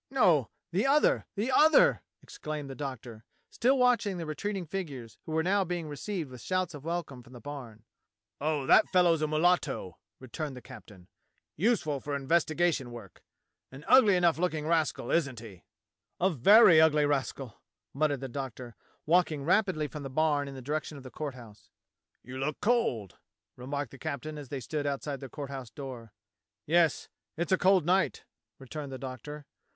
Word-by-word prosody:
"No 180 - +3
— - - -58
the 195 +9 +1
other, 295 +2 +3
the 220 +6 -1
other," 310 +4 +5 0.2
exclaimed 150 -2 -6
the - - -5
Doctor, 130 -5 -7 0.3
still 265 +3 +2
watching 240 -6 +2
the 170 - -4
retreating 185 +5 -4
figures 140 - -6
who - - -5
were 160 0 +1
now 195 +3 +2
being 175 -3 -4
received 150 +1 -5
with 125 -2 -10
shouts 185 -2 -1
of 145 -2 -9
welcome 165 -6 -4
from 120 +1 -17
the 120 - -10
barn. 125 -6 -9 0.6
"Oh, 150 -2 -1
that 215 - +5
fellow's 175 -4 +3
a 155 - +1
mulatto," 155 - 0 0.2
returned 135 +2 -6
the - - -9
captain; 95 -7 -13 0.5
"useful 170 - +1
for 145 +1 -4
investigation 155 0 +1
work. 115 -6 -11 0.5
An 135 +4 -12
ugly 245 -6 +6
enough 170 -3 +2
look 180 -2 0
ing 150 -1 -4
rascal, 160 -6 0
isn't 140 -8 0
he? 105 -6 -12 0.3
" - - -57
"A 190 +2 +2
very 170 - +7
ugly 150 -2 +4
rascal," 135 -4 -3 0.3
muttered 145 -1 0
the 135 - -4
Doctor, 125 -3 -7 0.3
walking 160 -3 +2
rapidly 180 -2 +1
from 150 +1 -8
the 135 - -6
barn 145 0 +1
in 135 - -8
the 130 - -9
direction 150 +2 -3
of 135 - -11
the 130 - -10
Court 145 -4 -5
House. 110 -5 -14 0.5
"You 130 +2 -8
look 145 +2 -2
cold," 205 - 0 0.4
remarked 140 +2 -5
the 140 - -13
captain 155 0 -5
as 140 -4 -10
they 140 -2 -4
stood 145 +4 -3
outside 140 0 -3
the 135 - -8
Court 140 0 -7
House 130 -4 -7
door. 125 -5 -9 0.5
"Yes. 165 -1 +2 0.3
It's 170 +3 -2
a 185 - +5
cold 185 -3 +4
night," 185 +3 +1 0.3
returned 140 +1 -7
the 130 - -5
Doctor. 135 +3 -8
150 Hz, 175 wpm, -29 LUFS, 130-175 Hz, 0.6 s, very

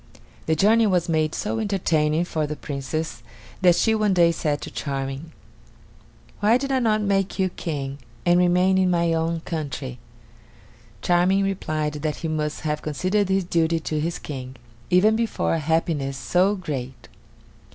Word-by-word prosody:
The 160 - +3
journey 220 +6 +4
was 180 -3 +1
made 155 -2 +1
so 225 - -2
entertaining 170 -6 +1
for 155 -3 -2
the 150 - -4
Princess 145 0 -4 0.4
that 180 -2 +6
she 225 - +2
one 210 -3 +2
day 170 -1 +5
said 150 -3 -1
to - - -7
Charming: 135 +2 -4 1.1
"Why 215 +4 +4
did 275 +1 -3
I 265 - +2
not 215 -3 +2
make 195 -1 0
you 190 -1 +1
King, 140 -5 -5 0.3
and 175 0 +5
remain 180 +1 +3
in 185 -1 +3
my 170 -1 +2
own 165 0 -1
country?" 145 - -5 1.0
Charming 180 +3 +3
replied 155 -6 -2
that 155 -1 -1
he 165 - -5
must 150 -1 -2
have 150 -1 -2
considered 185 +6 0
his 190 0 +2
duty 165 -1 +1
to 155 -1 -2
his 165 +3 -2
King, 130 -3 -7 0.3
even 195 +5 +4
before 230 -5 0
a 165 - +1
happiness 155 -3 0
so 180 +10 +2
great. 135 -8 -6
170 Hz, 160 wpm, -23 LUFS, 150-190 Hz, 1.1 s, that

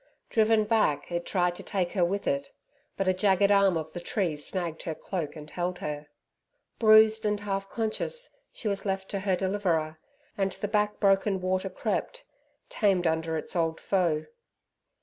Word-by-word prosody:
Driven 220 -1 +4
back, 210 -9 +1
it 175 0 -2
tried 180 -2 +1
to - - -8
take 185 -4 -2
her 185 - +1
with 195 +4 -1
it. 280 - -1 0.5
But 195 - -1
a 185 - +4
jagged 195 +1 +3
arm 200 -3 +4
of 155 0 -5
the 175 - -4
tree 175 -2 -1
snagged 165 +2 -3
her 160 - -4
cloak 165 -5 -4
and 150 -1 -9
held 180 +3 -3
her. 150 -2 -5 0.7
Bruised 220 0 +6
and 210 -1 0
half 195 -1 -3
conscious 235 - -2 0.2
she 225 - -5
was 200 -1 -1
left 195 -1 -2
to 200 - -2
her 190 -1 +1
deliverer, 175 -5 -1 0.4
and 195 -1 0
the 205 - -4
back 210 0 0
broken 195 -1 +3
water 185 +1 -1
crept - - -3 0.4
tamed 195 -5 +1
under 160 0 0
its 155 - -4
old 165 -1 0
foe. 175 -6 +1
190 Hz, 170 wpm, -28 LUFS, 170-205 Hz, 0.7 s, Bruised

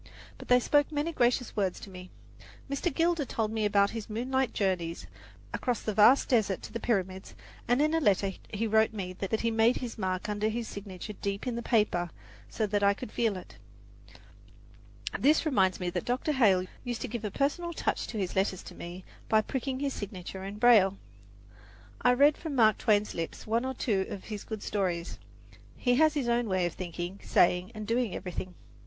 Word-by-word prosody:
But - - -10
they 250 0 +6
spoke 290 +4 +2
many 300 +2 -1
gracious 245 -4 +1
words 195 -3 0
to 195 - -10
me. 180 0 -10 0.6
Mr. 280 +5 -1
Gilder 330 +1 +1
told 225 -4 -2
me 220 -1 0
about 200 -1 +3
his 225 -2 -6
moonlight 255 +4 0
journeys 180 -4 -1 0.5
across 245 -2 -1
the 215 - -1
vast 220 +6 +6
desert 210 -7 +2
to - - -9
the 230 - -3
Pyramids, 190 -5 -2 0.3
and 245 +4 +3
in 310 +1 +1
a 325 - +3
letter 200 - +2 0.2
he 215 +2 -1
wrote 220 0 +3
me 185 -3 -5 0.2
he 230 - 0
made 225 +2 +3
his 240 -3 -6
mark 185 +1 -2
under 210 +1 0
his 230 +1 -3
signature 200 0 -7
deep 200 +1 -4
in 250 -2 -2
the 235 - -3
paper 210 -8 +1 0.4
so 220 - -1
that 205 0 0
I 200 0 +4
could 210 - -8
feel 225 -5 0
it. 180 - -11 1.6
This 305 +4 +4
reminds 190 -11 +2
me 180 -1 -2
that 180 -1 -3
Dr. 255 +5 0
Hale 200 -10 +4 0.2
used 240 -2 -4
to - - -2
give 235 -1 -5
a 210 - -1
personal 290 - -1
touch 330 - -2
to 225 - -5
his 190 -3 -2
letters 190 -1 0
to - - -10
me 175 +2 -8 0.2
by 215 0 +4
pricking 265 +2 -3
his 280 -2 -1
signature 190 -2 -7
in 200 +2 -6
braille. 210 -4 +5 1.0
I 245 - +5
read 285 +4 +5
from 315 -4 -4
Mark 220 -4 +4
Twain's 210 -2 +2
lips 165 -1 -5
one 230 +3 0
or 260 0 -3
two 200 -6 0
of 195 - -6
his 210 -2 -7
good 220 -2 -6
stories. 180 -4 -2 0.6
He 245 - +2
has 310 +1 +4
his 275 -5 -1
own 235 -1 +1
way 185 -2 +1
of 175 - -2
thinking, 175 +1 -5
saying 180 +1 +3
and 215 0 -5
doing 230 -1 0
everything. 180 0 -5
215 Hz, 195 wpm, -29 LUFS, 190-245 Hz, 1.6 s, they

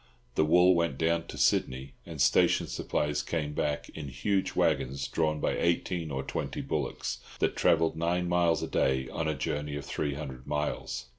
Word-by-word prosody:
The 80 - +3
wool 90 +4 +6
went 85 -6 0
down 85 +1 +1
to - - -8
Sydney, 65 +1 +1
and - - -8
station - - +4
supplies 75 0 -1
came 75 -1 -3
back, 75 0 -1
in 75 -2 -7
huge 95 +9 -1
waggons 70 +1 +1
drawn 75 -2 0
by - - 0
eighteen 85 -1 0
or 65 -2 -3
twenty - - -3
bullocks, - - -3 0.2
that - - +1
travelled 80 -1 +3
nine 85 +2 0
miles 85 -1 +2
a - - -2
day 65 -1 +1
on 80 +2 -2
a 80 - 0
journey 75 +2 -3
of 75 - -5
three 70 -2 -2
hundred 65 -4 -7
miles. 75 -4 -2
75 Hz, 175 wpm, -29 LUFS, 70-85 Hz, 0.2 s, wool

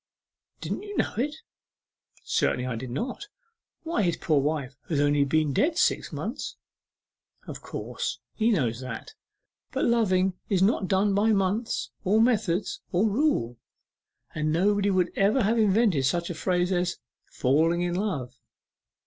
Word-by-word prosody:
'Didn't - - -3
you 410 -1 -7
know - - 0
it?' 285 +7 -1 0.9
'Certainly 125 - 0
I 125 -2 -2
did 125 +2 -6
not. 245 - -4 0.6
Why, 330 -8 0
his 170 -4 +1
poor 150 -4 +2
wife 140 -2 -2
has 155 -4 +1
only 145 0 +3
been 150 +1 +1
dead 320 - +1
six 360 - +1
months.' - - -5 0.9
'Of - - -8
course - - -4 0.2
he 225 +1 +1
knows 125 - +1
that. 130 -3 -7 0.6
But - - 0
loving 190 -5 +2 0.2
is 190 -2 +3
not 200 -1 +2
done 195 +2 +2
by 215 +3 +3
months, 200 +4 -1
or 210 +3 +3
method, 210 -6 +2 0.3
or 195 +5 +2
rule, 205 - 0 0.8
or 155 - -3
nobody 195 +6 +2
would 185 -2 +1
ever 210 +6 +3
have 225 +3 +2
invented 205 - +3
such 170 +6 0
a - - -3
phrase 180 +2 0
as 180 -1 0 0.3
"falling 160 +6 +2
in 175 0 -1
love." 175 - -2
185 Hz, 150 wpm, -26 LUFS, 155-215 Hz, 0.9 s, only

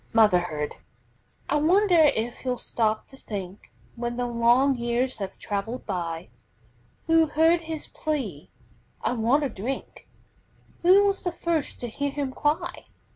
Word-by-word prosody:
MOTHERHOOD 175 -9 +2 0.7
I 295 - +1
wonder 345 +1 +5
if 235 +2 -2
he'll 250 -1 -2
stop 220 -2 -1
to 270 - -14
think, 195 -5 -7 0.2
When 240 0 -3
the 245 - 0
long 240 +3 +3
years 240 0 -1
have 195 -2 -5
traveled 215 +5 -4
by, 170 -3 -4 0.8
Who 325 -1 +4
heard 325 +3 +3
his 320 -2 -6
plea: 255 - -4 0.5
"I - - +1
want 250 +5 +2
a 280 - 0
drink!" 235 +5 -6 0.7
Who 375 +3 +6
was 395 -1 +1
the 355 - -1
first 335 -3 -2
to 240 - -2
hear 285 +5 -2
him 280 -1 -3
cry? 330 +6 -1
250 Hz, 140 wpm, -26 LUFS, 220-310 Hz, 0.8 s, Who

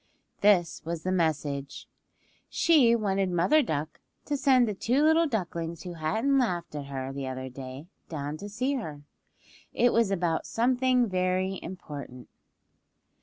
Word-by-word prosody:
This 190 -5 +3
was 165 0 -4
the 185 - -1
message. 150 -5 -1 0.6
She 275 -9 +4
wanted 195 -4 0
Mother 180 - +3
Duck 155 - -3 0.3
to 295 - -1
send 260 -4 +4
the 210 - -1
two 245 +8 +1
little 320 +1 +4
ducklings 170 - -3
who 180 - -6
hadn't 220 - +1
laughed 180 -12 -1
at 145 -2 -5
her 135 -1 -5
the 135 -1 -4
other 130 0 -5
day 130 +2 -8 0.2
down 145 -2 -4
to 205 +5 -8
see 255 +7 -1
her. 150 - -7 0.7
It 245 0 +3
was 230 -3 +3
about 170 -4 -1
something 250 +1 +2
very 185 0 0
important. 145 -8 -8
185 Hz, 145 wpm, -28 LUFS, 150-235 Hz, 0.7 s, She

